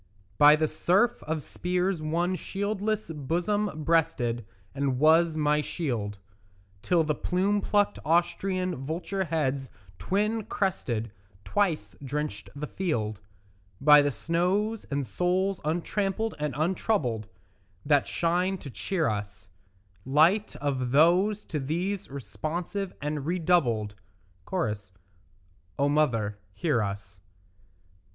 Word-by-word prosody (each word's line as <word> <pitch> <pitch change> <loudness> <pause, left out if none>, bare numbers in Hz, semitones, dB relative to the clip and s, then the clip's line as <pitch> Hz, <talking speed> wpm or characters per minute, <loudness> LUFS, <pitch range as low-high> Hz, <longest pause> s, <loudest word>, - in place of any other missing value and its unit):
By 150 +1 +9
the 155 0 +1
surf 190 +9 +2
of 155 -2 -2
spears 180 -1 -1
one 170 +4 0
shieldless 205 0 -2
bosom 170 +4 -1
breasted 140 -9 +1 0.3
And 135 -2 0
was 160 +3 +4
my 150 0 +2
shield, 120 - -3 0.6
Till 170 - +3
the 155 -1 0
plume 195 +6 0
plucked 205 0 +1
Austrian 175 +2 +1
vulture 180 +6 -2
heads 140 -5 -1 0.3
twin 210 - 0
crested 120 - -2 0.3
Twice 195 -6 0
drenched 135 -7 -4
the 145 +1 -4
field; 110 - -2 0.6
By 150 +1 +8
the 145 - +2
snows 190 - 0
and 140 -1 -2
souls 185 +5 0
untrampled 195 +7 -1
and 150 -4 -2
untroubled 155 - 0 0.6
That 145 -2 +3
shine 180 +3 +1
to 140 - -9
cheer 175 +4 -1
us, 100 -3 -4 0.5
Light 160 +10 +3
of 135 -3 -2
those 180 - +4
to 155 - -3
these 180 +8 -2
responsive 170 - -4
and 150 -1 -3
redoubled; 155 - +1 0.6
(Cho.) 150 - 0 1.0
O 140 - +2
mother, 115 -9 +1 0.2
hear 150 - +1
us. 100 -1 -5
160 Hz, 110 wpm, -28 LUFS, 140-185 Hz, 1.0 s, By